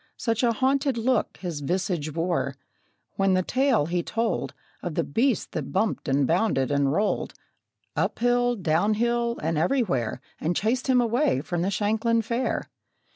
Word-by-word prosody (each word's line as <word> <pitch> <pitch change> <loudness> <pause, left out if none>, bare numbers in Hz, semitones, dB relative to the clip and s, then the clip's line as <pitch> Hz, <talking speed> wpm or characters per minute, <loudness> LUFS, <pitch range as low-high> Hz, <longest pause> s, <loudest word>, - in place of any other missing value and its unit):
Such 230 -1 0
a 240 -2 +3
haunted 270 +1 +1
look 240 +1 0
his 175 -5 -4
visage 170 0 -1
wore, 165 -4 -1 0.6
When 195 -1 +3
the 185 - +2
tale 255 - +2
he 175 +2 0
told 225 +6 -2 0.3
Of 175 -4 -4
the - - +1
beast 240 - 0
that - - -4
bumped 205 -1 0
and 135 0 +2
bounded 160 - +1
and 140 -1 +2
rolled, 205 +7 0 0.6
Up - - 0
hill, 245 0 +2
down 185 +2 +1
hill, 235 +1 0
and 160 0 0
everywhere, 170 - 0 0.2
And 170 +3 -1
chased 235 +8 0
him 255 -2 +4
away 235 - +1
from 175 +2 -3
the 185 - +1
Shanklin 220 +3 +1
Fair! 235 +3 -1
205 Hz, 160 wpm, -26 LUFS, 165-240 Hz, 0.6 s, him